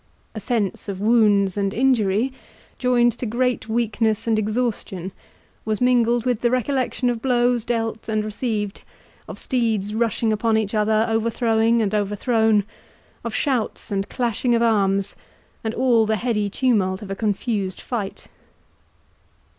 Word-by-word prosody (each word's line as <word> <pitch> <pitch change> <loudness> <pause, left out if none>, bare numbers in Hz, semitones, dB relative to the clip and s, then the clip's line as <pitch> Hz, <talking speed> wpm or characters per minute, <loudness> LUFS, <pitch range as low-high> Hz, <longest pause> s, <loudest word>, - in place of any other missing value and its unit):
A 215 - -5
sense 210 -2 -2
of 190 -2 -4
wounds 205 -3 +3
and 200 0 -1
injury, 240 -1 +2 0.5
joined 245 -1 +3
to 245 - -2
great 245 +1 -1
weakness 225 -1 0
and 225 -2 +2
exhaustion, 210 -4 -2 0.5
was 215 -1 -1
mingled 240 -1 +2
with 245 -3 0
the 240 - +3
recollection 255 0 0
of 230 -2 -5
blows 245 -2 +2
dealt 225 -1 -3
and 215 -1 0
received, 215 -2 -3 0.5
of - - -8
steeds 220 -5 -1
rushing 225 0 0
upon 220 +1 +1
each 215 -1 -1
other, 215 +1 +2
overthrowing 225 0 +2
and 205 0 -1
overthrown—of 210 0 -1
shouts 255 -7 -1
and 195 0 -2
clashing 240 0 0
of 235 - +2
arms, 200 -3 +1 0.5
and 220 0 -3
all 235 -3 +3
the 220 - +2
heady 210 -2 -1
tumult 205 -4 +1
of 195 - -7
a - - -2
confused 205 -2 -2
fight. 210 -6 -5
225 Hz, 140 wpm, -22 LUFS, 210-240 Hz, 0.5 s, wounds